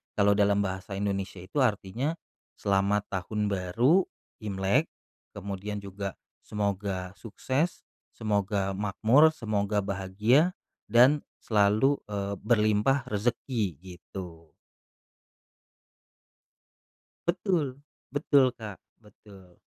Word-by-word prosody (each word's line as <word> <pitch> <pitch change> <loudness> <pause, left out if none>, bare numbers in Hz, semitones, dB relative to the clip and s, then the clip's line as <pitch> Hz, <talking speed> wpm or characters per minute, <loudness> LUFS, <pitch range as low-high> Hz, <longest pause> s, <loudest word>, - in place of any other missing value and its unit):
kalau 100 -1 +4
dalam 100 0 +3
bahasa 95 +1 -4
Indonesia 95 -2 -3
itu 120 +10 -3
artinya, 125 - 0 0.4
selamat 100 +1 +1
Tahun 105 +2 -2
Baru 115 - +2 0.3
Imlek, 100 -3 +1 0.5
kemudian 100 +1 -5
juga 100 0 -5 0.2
semoga 100 -3 -3
sukses, 130 - -2 0.3
semoga 100 -2 0
makmur, 110 +10 +4
semoga 105 -2 0
bahagia 105 - +2 0.3
dan 125 +7 +6 0.2
selalu, 110 +6 +3 0.2
eee, 100 0 -2
berlimpah 115 +4 +2
rezeki, 110 - -1
gitu. 90 -2 -10 2.8
Betul, 170 -7 0 0.3
betul, 140 -2 +3
Kak. 105 -4 -8 0.2
Betul. 100 -4 -18
105 Hz, 85 wpm, -28 LUFS, 95-120 Hz, 2.8 s, dan